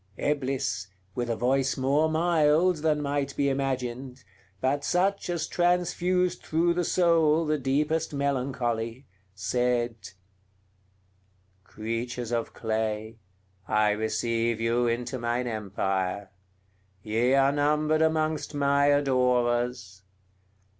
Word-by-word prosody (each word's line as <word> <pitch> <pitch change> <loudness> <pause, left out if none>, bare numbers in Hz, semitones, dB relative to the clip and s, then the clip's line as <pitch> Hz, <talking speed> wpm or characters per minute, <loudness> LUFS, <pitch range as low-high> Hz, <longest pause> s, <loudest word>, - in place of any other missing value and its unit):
Eblis, 135 -9 -1 0.3
with 120 +2 -3
a 115 - 0
voice 130 +4 +1
more 140 +4 +2
mild 165 +1 +3
than 150 -1 0
might 140 -1 -2
be 140 -1 +1
imagined, 130 -1 -3 0.4
but 140 +2 0
such 190 +3 0
as 170 -2 -1
transfused 180 +1 +1
through 170 +2 +1
the 175 +1 0
soul 165 -3 +3
the 155 -1 0
deepest 150 +4 0
melancholy, 130 -4 -2 0.3
said: 120 +4 0 1.7
"Creatures 115 +3 -4
of 115 -1 -1
clay, 110 0 -3 0.5
I 105 0 +3
receive 115 +2 -1
you 120 +1 +1
into 120 +2 -2
mine 120 +1 -1
empire; 100 -3 -2 0.7
ye 115 +5 +2
are 135 0 +4
numbered 150 +2 +1
amongst 155 -1 0
my 140 0 +3
adorers. 125 -6 +1
130 Hz, 105 wpm, -27 LUFS, 115-150 Hz, 1.7 s, are